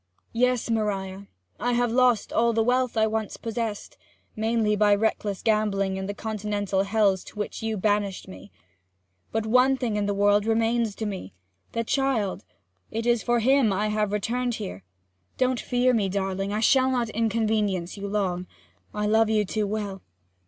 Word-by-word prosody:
'Yes, 250 0 +1
Maria 200 -3 -2 0.3
I 245 0 0
have 240 -1 +1
lost 245 -2 +2
all 235 0 +3
the 225 0 +2
wealth 250 0 +1
I 220 - +4
once 220 -1 -2
possessed 225 -2 -4 0.4
mainly 220 -1 +1
by 205 0 +4
reckless 205 -2 -1
gambling 205 -3 +1
in 190 0 -4
the 205 - -4
Continental 205 -3 -2
hells 200 -2 +2
to - - -13
which 210 - -4
you 220 -1 -2
banished 205 -1 0
me. 190 +1 -12 0.8
But 225 0 -1
one 255 +4 +4
thing 230 -5 -1
in 205 -1 0
the 205 - 0
world 205 +1 +3
remains 225 -1 +1
to 220 - -4
me 185 - -6 0.4
the 230 - -1
child 240 -6 0 0.5
and 225 +1 -3
it - - -1
is 240 -2 +3
for 240 -1 +1
him 265 0 +4
that 195 - 0
I 210 +2 0
have 210 -1 0
intruded 240 +4 -1
here. 190 - -6 0.5
Don't 255 -1 +1
fear 250 0 +1
me, 205 -5 +1
darling! 195 0 -2
I 210 +1 -1
shall 260 +3 +4
not 245 -3 0
inconvenience 215 -5 0
you 200 -1 -5
long; 185 -3 -1 0.5
I 210 0 -1
love 220 +1 +3
you 215 -1 +2
too 210 +2 -1
well! 200 -2 -4
215 Hz, 175 wpm, -25 LUFS, 200-230 Hz, 0.8 s, I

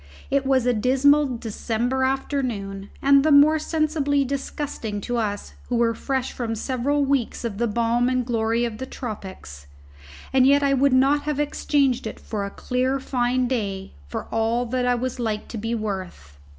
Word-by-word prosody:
It 275 -1 +1
was 260 -2 +3
a 250 - +3
dismal 265 +3 +3
December 235 +3 -2
afternoon, 245 -8 -2
and 275 0 +6
the 310 - +3
more 295 +2 +6
sensibly 305 -3 0
disgusting 270 -5 -4
to 245 +3 -2
us 205 -3 -3 0.2
who 245 - 0
were 230 -1 +2
fresh 265 +2 -2
from 230 -2 -3
several 270 +5 0
weeks 270 -4 -1
of 210 -3 -4
the 235 - +2
balm 235 +2 +1
and 255 -1 0
glory 230 0 0
of 225 -2 -5
the 260 - -5
tropics. 190 - -8 0.7
And 260 -1 +5
yet 285 +1 +4
I 275 0 +3
would 275 +1 +3
not 275 +3 +3
have 300 -1 -1
exchanged 280 -4 +1
it - - -7
for 205 -3 -4
a - - -4
clear 255 +5 -1
fine 250 -1 0
day 200 -6 -3
for 70 - -5
all 225 +2 +1
that 250 +1 -1
I 245 - +3
was 255 +1 -3
like 220 -3 -2
to 230 - -6
be 225 +2 -2
worth. 185 - -6
250 Hz, 175 wpm, -23 LUFS, 225-275 Hz, 0.7 s, and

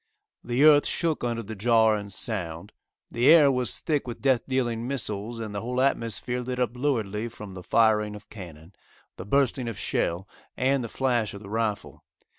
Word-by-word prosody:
The 125 +3 +1
earth 150 -1 +7
shook 165 -5 -1
under 115 -1 -2
the 110 +1 -7
jar 110 +1 +4
and 100 -1 -6
sound. 90 -6 -4 0.4
The 120 +3 +1
air 155 -4 +8
was 125 -2 -1
thick 150 -6 -1
with 120 - -6
death 130 -3 +2
dealing 120 -3 -1
missiles, 115 -3 -3
and 110 -2 -5
the 100 - -3
whole 125 +2 -3
atmosphere 125 -2 0
lit 125 0 -4
up 125 -1 0
luridly 115 -5 -1
from 105 -4 -10
the 90 - -8
firing 105 +1 +2
of 105 0 -12
cannon, 85 -3 -11 0.4
the 90 - -8
bursting 135 0 +1
of 115 - -5
shell 90 +3 -1 0.3
and 130 +1 +1
the 115 - -5
flash 120 -5 0
of 100 - -10
the 100 - -10
rifle. 110 -2 -3
115 Hz, 185 wpm, -26 LUFS, 105-125 Hz, 0.4 s, air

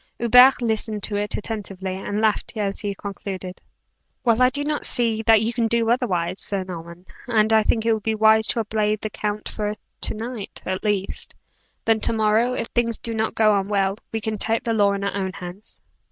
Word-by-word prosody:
Hubert 250 +2 +6
listened 220 -2 -1
to 205 - +1
it 205 +1 -2
attentively, 195 -4 -4
and 205 +2 -3
laughed 220 +1 0
as 200 -2 -1
he 205 -1 -3
concluded. 190 -2 -6 0.6
"Well, 235 0 +3
I 255 - +6
do 285 +3 -3
not 300 0 -2
see 230 -2 +1
that 220 -1 +6
you 230 +2 -1
can 230 -1 +1
do 230 0 +1
otherwise, 195 -8 0
Sir 195 -2 -1
Norman, 170 -1 -9 0.2
and 220 -2 +2
I 220 - +6
think 220 +1 0
it 230 - +4
would 220 - -2
be 220 +1 -1
wise 220 0 +5
to 230 - 0
obey 215 -1 0
the 215 0 -6
count 210 0 -3
for 210 -1 -3 0.3
to - - 0
night, 225 -1 -7
at 185 0 -3
least. 205 -2 -2 0.5
Then 225 -1 +3
to 215 - -1
morrow 220 +3 +2
if 230 - -2
things 230 -2 0
do 230 - -5
not 220 0 -1
go 215 -1 +4
on 195 -1 0
well, 195 -1 +1 0.2
we 225 - -2
can 215 0 -3
take 225 +2 +1
the 230 - 0
law 205 -2 +3
in 200 0 -3
our 200 - -1
own 190 -2 -2
hands." 180 +4 -10
215 Hz, 210 wpm, -23 LUFS, 200-225 Hz, 0.6 s, Hubert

